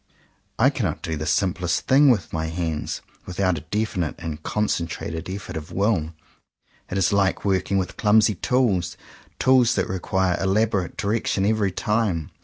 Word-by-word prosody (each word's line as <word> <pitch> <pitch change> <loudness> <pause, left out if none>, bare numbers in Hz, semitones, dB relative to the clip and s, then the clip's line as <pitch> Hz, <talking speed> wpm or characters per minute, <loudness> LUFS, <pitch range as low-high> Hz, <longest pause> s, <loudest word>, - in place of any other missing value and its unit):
I - - +4
cannot - - -2
do 80 - -2
the 80 +1 -4
simplest 85 +1 +1
thing 140 +2 +6
with 120 -5 +1
my 80 0 -1
hands 80 -2 -3 0.2
without 90 -2 0
a - - -12
definite 95 -1 -2
and 80 -2 -6
con 105 0 -1
centrated 85 -2 -3
efl^ort 95 0 -6
of 80 +1 -8
will. 90 -6 0 0.7
It 95 - -3
is 95 +1 +2
like 100 0 +1
working 95 0 +1
with 95 -2 -2
clumsy 105 0 +4
tools; 100 -5 0 0.4
tools 130 -3 +4
that - - 0
require 95 0 0
elabo 100 +1 +1
rate 90 - -8
direction 100 -2 0
every 105 -2 +2
time. 100 -6 -1
95 Hz, 160 wpm, -23 LUFS, 85-105 Hz, 0.7 s, thing